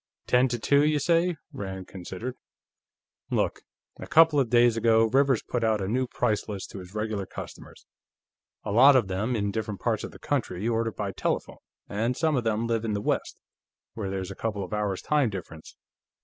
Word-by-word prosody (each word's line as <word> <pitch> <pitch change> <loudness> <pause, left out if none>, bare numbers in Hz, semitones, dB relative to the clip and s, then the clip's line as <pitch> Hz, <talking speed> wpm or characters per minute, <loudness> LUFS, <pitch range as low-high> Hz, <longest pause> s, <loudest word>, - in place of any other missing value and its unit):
"Ten 125 +1 +4
to 120 -1 -2
two, 140 +5 +3
you 150 0 +3
say," 170 +3 +2 0.2
Rand 95 -6 -6
considered. 95 +6 -6 1.0
"Look. - - 0 0.4
A - - -7
couple 160 -2 +6
of 130 -4 +1
days 120 -1 +5
ago, 115 0 +4
Rivers 135 +1 +2
put 120 -2 -2
out 110 -1 +2
a 95 - -2
new 125 +5 0
price 110 -2 -1
list 100 -3 -6
to 100 - -7
his 90 +2 -12
regular 105 -3 -2
customers. - - -10 0.8
A 105 - -4
lot 135 +6 +7
of 120 -7 +3
them, 105 +7 -1
in 100 -2 -1
different 105 -2 -4
parts - - -1
of - - -5
the - - -13
country, 90 +5 -2
order 115 -1 0
by 100 -2 -4
telephone, - - -3 0.3
and 115 +5 -1
some 160 -2 +2
of 125 - 0
them 110 0 0
live 115 -1 0
in 110 -2 -1
the 100 - -1
West, - - -1 0.6
where 100 -4 -4
there's 95 -1 -4
a - - -7
couple 105 -2 -3
of 95 - -7
hours' 105 -3 -1
time 150 -5 +2
difference. 80 -5 -9
110 Hz, 195 wpm, -27 LUFS, 100-125 Hz, 1.0 s, lot